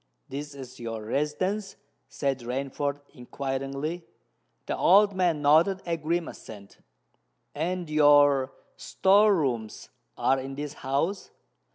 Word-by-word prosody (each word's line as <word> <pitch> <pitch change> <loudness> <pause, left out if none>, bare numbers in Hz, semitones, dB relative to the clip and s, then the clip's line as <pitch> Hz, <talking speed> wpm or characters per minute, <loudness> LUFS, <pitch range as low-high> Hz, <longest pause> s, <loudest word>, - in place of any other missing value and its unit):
"This 145 +1 -6
is 130 -2 -10
your 115 -2 -5
residence?" 185 - -2 0.3
said 135 -2 -2
Rainford 140 +3 -3
inquiringly. 135 +6 -4 0.6
The - - -2
old 200 +2 +5
man 175 -5 0
nodded 165 +7 +4
a 170 -1 -1
grim 165 +1 -2
assent. 100 -2 -12 0.7
"And 175 +3 -3
your 145 -3 +4 0.3
store 205 +2 +3
rooms 120 - -3 0.3
are 135 0 +2
in 135 +1 -6
this 145 0 -5
house? 145 +9 -1
145 Hz, 110 wpm, -27 LUFS, 135-170 Hz, 0.7 s, old